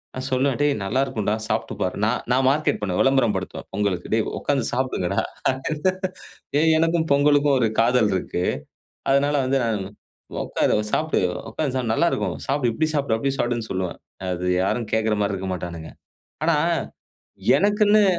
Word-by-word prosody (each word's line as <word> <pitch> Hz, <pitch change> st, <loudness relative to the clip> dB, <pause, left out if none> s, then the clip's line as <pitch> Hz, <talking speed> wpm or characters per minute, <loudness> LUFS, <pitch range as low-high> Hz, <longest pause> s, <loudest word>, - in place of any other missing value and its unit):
நான் 130 Hz, 0 st, -3 dB
சொல்லுவேன், 130 Hz, 0 st, +1 dB
"டேய் 145 Hz, 0 st, +3 dB
நல்லா 110 Hz, +7 st, +1 dB
இருக்கும்டா, 110 Hz, -5 st, -1 dB
சாப்ட்டு 110 Hz, +1 st, -2 dB
பாரு". 90 Hz, -, 0 dB
நான் 115 Hz, +3 st, +1 dB
நான் 130 Hz, +1 st, +3 dB
மார்க்கெட் 150 Hz, +3 st, +1 dB
பண்ணுவேன், 95 Hz, -3 st, 0 dB
விளம்பரம் 135 Hz, -6 st, +3 dB
படுத்துவேன் 95 Hz, -1 st, -5 dB
பொங்கலுக்கு, 100 Hz, -3 st, -1 dB
"டேய் 110 Hz, -1 st, +2 dB
உட்காந்து 135 Hz, -5 st, 0 dB
சாப்டுங்கடா." 125 Hz, -8 st, 0 dB, 1.4 s
ஏய் 160 Hz, 0 st, +4 dB
எனக்கும் 165 Hz, 0 st, +2 dB
பொங்கலுக்கும் 145 Hz, 0 st, +4 dB
ஒரு 115 Hz, -3 st, +2 dB
காதல் 115 Hz, -2 st, +3 dB
இருக்கு. 90 Hz, -1 st, -2 dB, 0.7 s
அதனால 140 Hz, +2 st, +3 dB
வந்து 135 Hz, +1 st, +2 dB
நான், 110 Hz, -3 st, 0 dB, 0.6 s
"உட்காரு -, -, +1 dB, 0.2 s
சாப்டு. 155 Hz, 0 st, +1 dB, 0.3 s
உட்காந்து 135 Hz, +2 st, -2 dB
சாப்டு. 120 Hz, -3 st, -1 dB
நல்லா 170 Hz, -, +3 dB
இருக்கும். -, -, -1 dB
சாப்டு, 135 Hz, -4 st, +1 dB
இப்படி 155 Hz, +7 st, 0 dB
சாப்டு, 140 Hz, -6 st, +1 dB
அப்படி 135 Hz, +4 st, -1 dB
சாப்படுனு" 120 Hz, -2 st, -1 dB
சொல்லுவேன். 95 Hz, -2 st, -3 dB, 0.3 s
அது 90 Hz, 0 st, -2 dB, 0.2 s
யாரும் 115 Hz, +3 st, -1 dB
கேட்குற 110 Hz, -1 st, +2 dB
மாரி 100 Hz, 0 st, 0 dB
இருக்க 95 Hz, 0 st, -4 dB
மாட்டானுங்க. 85 Hz, -2 st, -7 dB, 0.5 s
ஆனா, 165 Hz, -1 st, +3 dB, 1.0 s
எனக்குன்னு. 210 Hz, +1 st, +4 dB
125 Hz, 150 wpm, -23 LUFS, 105-145 Hz, 1.4 s, ஏய்